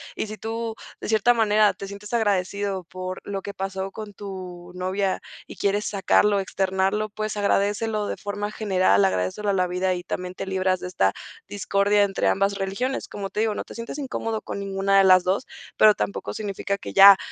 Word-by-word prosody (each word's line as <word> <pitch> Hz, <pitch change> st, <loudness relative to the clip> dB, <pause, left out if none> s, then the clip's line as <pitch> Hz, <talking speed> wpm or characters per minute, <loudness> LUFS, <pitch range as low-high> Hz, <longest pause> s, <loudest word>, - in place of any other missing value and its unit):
Y -, -, -3 dB
si 215 Hz, +1 st, -7 dB
tú, 225 Hz, 0 st, -4 dB, 0.3 s
de -, -, -5 dB
cierta 220 Hz, +2 st, +4 dB
manera, 215 Hz, -2 st, +4 dB
te 195 Hz, -, -8 dB
sientes 200 Hz, +2 st, -9 dB
agradecido 200 Hz, -3 st, 0 dB
por 185 Hz, +2 st, -6 dB
lo 195 Hz, -1 st, -4 dB
que 200 Hz, +1 st, -7 dB
pasó 195 Hz, 0 st, -4 dB
con 210 Hz, 0 st, -8 dB
tu 185 Hz, -3 st, -8 dB
novia 185 Hz, +1 st, -1 dB, 0.3 s
y -, -, -10 dB
quieres 205 Hz, +1 st, 0 dB
sacarlo, 200 Hz, 0 st, +3 dB
externarlo, 195 Hz, +2 st, 0 dB
pues, 215 Hz, +1 st, -4 dB
agradécelo 205 Hz, +1 st, +1 dB
de -, -, -3 dB
forma 205 Hz, 0 st, -4 dB
general, 185 Hz, -, +2 dB
agradécelo 95 Hz, -, -1 dB
a -, -, +3 dB
la 185 Hz, -1 st, +2 dB
vida, 180 Hz, +1 st, 0 dB
y 175 Hz, -, -6 dB
también 180 Hz, 0 st, -5 dB
te 195 Hz, -, -5 dB
libras 190 Hz, -1 st, 0 dB
de -, -, -4 dB
esta 95 Hz, -, +2 dB, 0.4 s
discordia 205 Hz, +1 st, +2 dB
entre 195 Hz, -1 st, 0 dB
ambas 195 Hz, +1 st, +2 dB
religiones. 200 Hz, +8 st, -2 dB
Como 195 Hz, -1 st, -6 dB
te -, -, -3 dB
digo, 220 Hz, -1 st, +1 dB
no -, -, -3 dB
te -, -, -12 dB
sientas 230 Hz, +4 st, -6 dB
incómodo 225 Hz, -6 st, -3 dB
con -, -, -5 dB
ninguna 195 Hz, 0 st, +2 dB
de -, -, +6 dB
las 185 Hz, -1 st, +7 dB
2, 185 Hz, +2 st, 0 dB, 0.3 s
pero 215 Hz, -1 st, +7 dB
tampoco 200 Hz, -, -3 dB
significa, 200 Hz, -1 st, -3 dB
que -, -, -8 dB
ya 195 Hz, 0 st, +10 dB
200 Hz, 195 wpm, -24 LUFS, 190-210 Hz, 0.4 s, ya